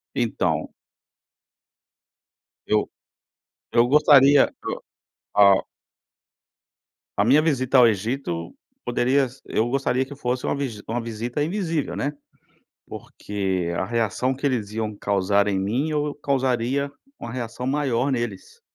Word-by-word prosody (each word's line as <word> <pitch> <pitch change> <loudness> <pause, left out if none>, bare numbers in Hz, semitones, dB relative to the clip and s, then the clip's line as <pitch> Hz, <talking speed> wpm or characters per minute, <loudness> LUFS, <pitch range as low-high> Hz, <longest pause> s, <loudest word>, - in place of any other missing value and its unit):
Então. - - -1 1.9
Eu 105 0 +1 0.8
eu 120 0 +5
gostaria, 145 -1 +6 0.2
eh, - - -2 0.6
a 100 -1 +6 1.6
A 100 - +3
minha 140 +6 +5
visita 135 -4 +1
ao 125 -2 +8
Egito 105 -5 -2 0.3
poderia 130 +3 +2
se 130 +2 -16
eu 110 - 0
gostaria 130 0 0
que 140 +2 -10
fosse 125 -2 -2
uma - - 0
v 140 -1 -2 0.2
uma 120 +2 -2
visita 115 +4 -3
invisível, 165 -3 -2
né, 145 +1 -2 0.7
porque 95 -4 -3
a - - 0
reação 115 +4 0
que 135 - -11
eles 115 -7 -1
iam 110 -1 -3
causar 100 0 +1
em 100 -2 0
mim, 115 +10 -1
eu 150 -1 -1
causaria 135 -1 0 0.3
uma 115 - -7
reação 125 0 -5
maior 135 -2 0
neles. 120 -6 -4
125 Hz, 120 wpm, -23 LUFS, 110-140 Hz, 1.9 s, ao